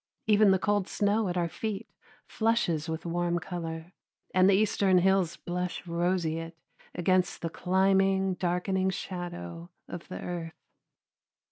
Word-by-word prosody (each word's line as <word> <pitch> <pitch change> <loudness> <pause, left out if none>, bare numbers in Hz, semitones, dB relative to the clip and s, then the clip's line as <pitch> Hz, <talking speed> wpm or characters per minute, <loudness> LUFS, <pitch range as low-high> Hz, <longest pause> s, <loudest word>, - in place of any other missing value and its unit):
Even 215 -1 +5
the 190 - +5
cold 205 0 0
snow 205 0 +1
at 175 - -2
our 170 -1 +1
feet 215 +5 -4 0.4
flushes 200 -9 0
with 160 +1 -4
warm 175 0 0
color, 170 -1 -5 0.4
and 185 +1 +5
the 195 - +5
eastern 195 -2 +3
hills 185 -2 +2
blush 180 +1 -4
roseate 170 -1 -1 0.4
against 180 0 +1
the 165 - -2
climbing, 190 +1 +2
darkening 185 +2 0
shadow 85 - -6 0.2
of - - -8
the 90 - -6
earth. 170 -2 -5
180 Hz, 130 wpm, -29 LUFS, 170-195 Hz, 0.4 s, Even